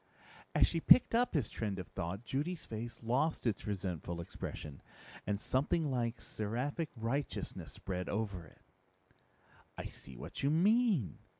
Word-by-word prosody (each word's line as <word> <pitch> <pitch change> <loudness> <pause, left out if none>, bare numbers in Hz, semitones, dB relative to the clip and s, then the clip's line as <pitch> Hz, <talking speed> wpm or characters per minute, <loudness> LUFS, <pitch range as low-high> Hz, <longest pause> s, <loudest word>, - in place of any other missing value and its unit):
As - - +7
she 165 - 0
picked 250 - +8
up 240 -4 +3
his 135 -9 +2
trend 105 -4 -3
of 90 - -5
thought, 95 +7 -4
Judy's 155 +8 -2
face 115 +1 -6
lost 125 +8 +1
its 110 -3 0
resentful 90 -4 -2
expression, 80 -4 -6 0.5
and 100 0 +1
something 145 +6 +1
like 120 -2 0
seraphic 125 +9 -2
righteousness 125 +5 -3
spread 90 -1 -4
over 100 -4 -1
it. - - -21 1.1
"I - - -4
see 65 -1 -7
what - - -6
you 140 - +3
mean. 195 - +3
115 Hz, 140 wpm, -35 LUFS, 100-150 Hz, 1.1 s, picked